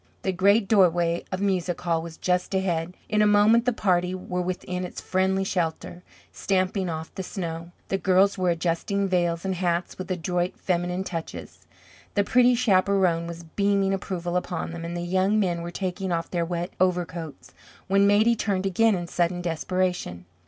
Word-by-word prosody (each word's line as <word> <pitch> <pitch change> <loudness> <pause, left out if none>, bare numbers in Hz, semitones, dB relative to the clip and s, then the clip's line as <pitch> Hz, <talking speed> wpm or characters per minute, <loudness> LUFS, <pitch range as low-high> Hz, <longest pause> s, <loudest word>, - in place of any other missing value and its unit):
The 190 - +1
great 200 +3 +3
doorway 175 -4 +3
of 185 0 -3
Music 185 -3 0
Hall 170 -2 0
was 165 0 -9
just 180 +1 0
ahead. 180 -2 -1
In 215 0 +1
a 210 - +5
moment 210 +3 +5
the 250 - +3
party 180 -4 +1
were 180 -1 -3
within 180 0 -3
its 180 - -6
friendly 190 +1 0
shelter, 175 -1 -3 0.3
stamping 185 -1 0
off 160 0 -5
the - - -5
snow. 170 -3 -5 0.2
The 195 - 0
girls 195 +1 +3
were 185 -2 0
adjusting 175 +4 0
veils 175 -2 0
and 190 - 0
hats 175 -1 -2
with 185 - -6
adroit 180 0 -1
feminine 180 0 -1
touches; 165 -4 -7 0.5
the 200 - +3
pretty 250 +3 +4
chaperon 190 -6 +2
was 170 0 -7
beaming 195 +3 +1
approval 180 -2 -3
upon 175 -2 -3
them, 170 0 -7
and 170 +1 -4
the - - -3
young 190 +4 +1
men 175 -4 0
were 170 - -5
taking 185 +1 -3
off 165 -1 -2
their 170 -2 0
wet 175 +1 -3
overcoats, 175 -4 -2 0.3
when 195 +1 +3
Maidie 215 +3 +4
turned 195 -3 -1
again 215 +3 +3
in 175 -1 -3
sudden 175 +1 0
desperation. 175 - -2
180 Hz, 175 wpm, -25 LUFS, 170-195 Hz, 0.5 s, a